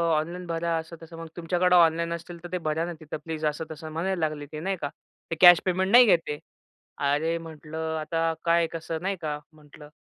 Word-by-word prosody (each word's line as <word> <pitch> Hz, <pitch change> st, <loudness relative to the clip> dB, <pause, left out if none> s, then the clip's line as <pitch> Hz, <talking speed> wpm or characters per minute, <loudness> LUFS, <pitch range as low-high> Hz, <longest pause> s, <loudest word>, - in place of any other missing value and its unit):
Online 170 Hz, +4 st, -3 dB
भरा 165 Hz, 0 st, -1 dB
असं-तसं 165 Hz, 0 st, -8 dB
मग 165 Hz, 0 st, -7 dB
तुमच्याकडं 180 Hz, +1 st, +2 dB
ऑनलाईन 170 Hz, 0 st, +4 dB
असतील 170 Hz, +1 st, -7 dB
तर -, -, -5 dB
ते 180 Hz, -, 0 dB
भरा 155 Hz, +2 st, 0 dB
ना 175 Hz, -, -5 dB
तिथं 155 Hz, -1 st, -6 dB
प्लीज 160 Hz, -1 st, -4 dB
असं 150 Hz, +2 st, -1 dB
तसं 160 Hz, 0 st, -8 dB
म्हणायला 180 Hz, +4 st, -1 dB
लागले 155 Hz, -2 st, -2 dB
ते, 155 Hz, -, -5 dB
नाही 195 Hz, +4 st, -1 dB
का. 145 Hz, -, -2 dB, 0.4 s
ते -, -, 0 dB
कॅश 175 Hz, -1 st, +10 dB
पेमेंट 190 Hz, +1 st, +1 dB
नाही 245 Hz, +1 st, +9 dB
घेत 190 Hz, -6 st, +5 dB
आहे. 150 Hz, -, -2 dB, 0.6 s
अरे, 150 Hz, +4 st, +1 dB
म्हटलं 160 Hz, 0 st, -5 dB
आता 165 Hz, +1 st, 0 dB
काय 170 Hz, 0 st, +3 dB
कसं 165 Hz, 0 st, -4 dB
नाही 195 Hz, +1 st, -1 dB
का, 150 Hz, -2 st, -3 dB
म्हटलं 150 Hz, -1 st, -15 dB
165 Hz, 205 wpm, -26 LUFS, 155-175 Hz, 0.6 s, कॅश